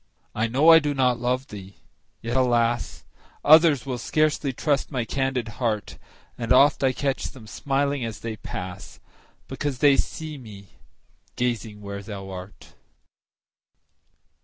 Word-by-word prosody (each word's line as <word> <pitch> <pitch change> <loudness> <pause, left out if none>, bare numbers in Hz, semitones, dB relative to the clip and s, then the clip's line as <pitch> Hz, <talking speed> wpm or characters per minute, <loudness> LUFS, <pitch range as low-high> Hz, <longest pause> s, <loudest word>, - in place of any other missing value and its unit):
I 110 +2 0
know 135 +8 +4
I 165 - +9
do 145 -2 -2
not 125 -3 +2
love 125 +2 -1
thee! 100 -1 -10 0.5
yet, 120 +2 -3
alas! 120 -2 +1 0.4
Others 155 -3 +6
will 125 -3 -4
scarcely 155 +2 0
trust 140 +2 -1
my 125 -4 -2
candid 135 -2 -1
heart; 110 -4 -2 0.4
And 115 -1 -4
oft 140 +3 +5
I 135 - +4
catch 135 +1 -2
them 125 -5 -13
smiling 140 +3 -1
as 115 -3 -5
they 115 -1 -5
pass, 90 -1 -8 0.5
Because 145 -3 -3
they 140 +1 +5
see 155 -2 -4
me 100 -5 -12 0.7
gazing 115 -4 -2
where 100 0 -6
thou 100 -1 -8
art. 95 +2 -10
125 Hz, 135 wpm, -24 LUFS, 110-140 Hz, 0.7 s, I